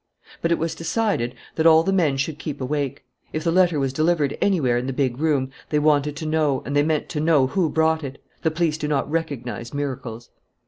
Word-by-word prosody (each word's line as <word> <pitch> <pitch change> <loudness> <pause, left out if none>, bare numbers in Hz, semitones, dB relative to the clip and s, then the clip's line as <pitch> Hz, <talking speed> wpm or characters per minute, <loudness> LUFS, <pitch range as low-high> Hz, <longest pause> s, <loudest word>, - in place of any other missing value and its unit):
But 165 - 0
it 170 - +3
was 165 +1 -2
decided 165 - -1 0.2
that 160 0 +3
all 160 0 +7
the 195 - 0
men 155 -8 +2
should 145 +2 -2
keep 150 -3 -5
awake. 140 -1 -3 0.3
If 155 - -2
the 170 - +1
letter 175 -3 +3
was 135 -1 -1
delivered 155 -1 +1
anywhere 155 -12 +2
in 125 - -4
the 135 - -2
big 130 -2 -1
room, 145 -4 +1 0.2
they 150 - +1
wanted 150 -1 +2
to 155 - -6
know 155 -3 +1
and 140 - -3
they 145 - +5
meant 155 0 0
to 150 - -3
know 155 -3 +4
who 165 +4 0
brought 160 0 +1
it. 140 0 -7 0.2
The 160 - +2
police 160 -1 0
do 150 - -2
not 145 -2 0
recognize 140 -7 -3
miracles. 125 -5 -5
150 Hz, 220 wpm, -23 LUFS, 135-160 Hz, 0.3 s, all